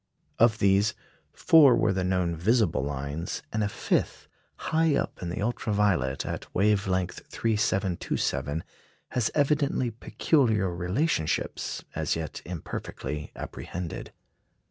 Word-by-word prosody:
Of 110 -2 +5
these, 100 +1 +3 0.4
four 145 -6 +6
were 110 -4 +2
the 95 -1 -1
known 90 -2 0
visible 105 - +2
lines, 70 +4 -4
and 110 0 +1
a 105 - 0
fifth, - - -1 0.3
high 160 -1 +1
up - - -2
in 90 - -3
the 90 +3 -3
ultra 115 -1 -1
violet, 85 -11 +1
at - - -5
wave 100 0 +3
length 90 -1 -1
3,727, 95 -8 -1 0.5
has 125 -3 0
evidently 140 -4 +2
peculiar 110 - +1
relationships, 90 - -1
as - - 0
yet 80 -3 -5
imperfectly 75 -3 -5
apprehended. 90 -2 -6
100 Hz, 120 wpm, -27 LUFS, 85-115 Hz, 0.5 s, four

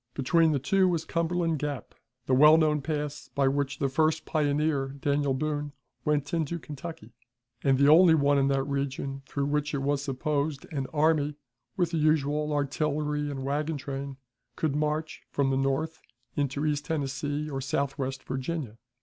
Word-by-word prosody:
Between 160 +4 +3
the 145 - +2
two 185 +8 +2
was 170 -3 0
Cumberland 165 -1 0
Gap, 145 -2 -4 0.3
the 130 - +1
well 150 +4 +8
known 155 -2 +2
pass 150 0 -4
by 140 -1 +3
which 140 +1 0
the 140 - +1
first 155 +4 +1
pioneer, 145 -2 0
Daniel 140 -1 +1
Boone, 145 0 -2 0.3
went 150 0 0
into 165 0 0
Kentucky, 150 -6 -8 0.5
and 135 -1 +4
the 140 +1 +4
only 165 +2 +7
one 140 -1 +3
in 135 - +3
that 135 -1 +1
region 140 0 -3
through 140 -1 -2
which 145 +1 -1
it 135 - -2
was 140 0 +1
supposed 145 +1 -2
an 135 -2 -2
army, 150 -1 +2 0.4
with 175 -3 +1
the 165 - 0
usual 150 -1 +2
artillery 150 +1 -1
and 135 -2 -4
wagon 150 +3 -1
train, 135 0 -5 0.4
could 155 -3 -1
march 150 +1 -1
from 135 -1 +1
the - - +1
north 135 +4 -1 0.3
into 145 +1 -1
East 150 -1 0
Tennessee 145 0 -2
or 135 -3 -4
southwest 135 -1 -2
Virginia. 130 -3 -4
145 Hz, 165 wpm, -28 LUFS, 135-155 Hz, 0.5 s, well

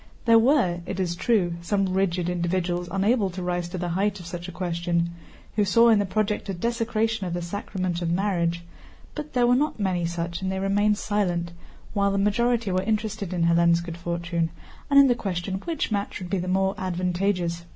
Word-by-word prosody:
There 230 -1 +7
were, 230 - +3
it - - -4
is 175 -2 -1
true, 175 -4 +1
some 195 +3 +1
rigid 180 -2 0
individuals 175 0 -1
unable 200 +2 +2
to 185 0 -6
rise 175 -1 -2
to 185 - -5
the 175 0 -2
height 200 +3 0
of 175 - -10
such 175 +1 -6
a - - -6
question, 170 -1 -1 0.4
who 210 - +3
saw 230 +4 +5
in 220 -2 +5
the 200 - 0
project 210 +1 -1
a 195 - -2
desecration 225 0 -1
of 170 - -3
the 175 - -2
sacrament 185 -1 -3
of 170 - -1
marriage, 170 -2 0 0.5
but 300 0 -7
there 245 -2 +3
were 245 - +4
not 295 -1 0
many 180 -4 0
such 170 0 -4
and 190 0 -1
they 190 - -2
remained 205 +2 +2
silent, 180 -6 -1 0.4
while 200 -1 +2
the 200 - 0
majority 230 +1 +1
were 185 0 +1
interested 215 -1 -2
in 175 -2 0
Hélène's 170 0 +4
good 170 -1 -6
fortune 170 -1 -2 0.4
and 280 -1 +7
in 280 - +8
the 250 - +4
question 190 -3 -3
which 330 -8 -2
match 205 -1 -2
would 180 -2 -8
be 195 - +1
the 180 - -4
more 190 +1 +1
advantageous. 180 -1 -1
185 Hz, 205 wpm, -25 LUFS, 175-210 Hz, 0.5 s, in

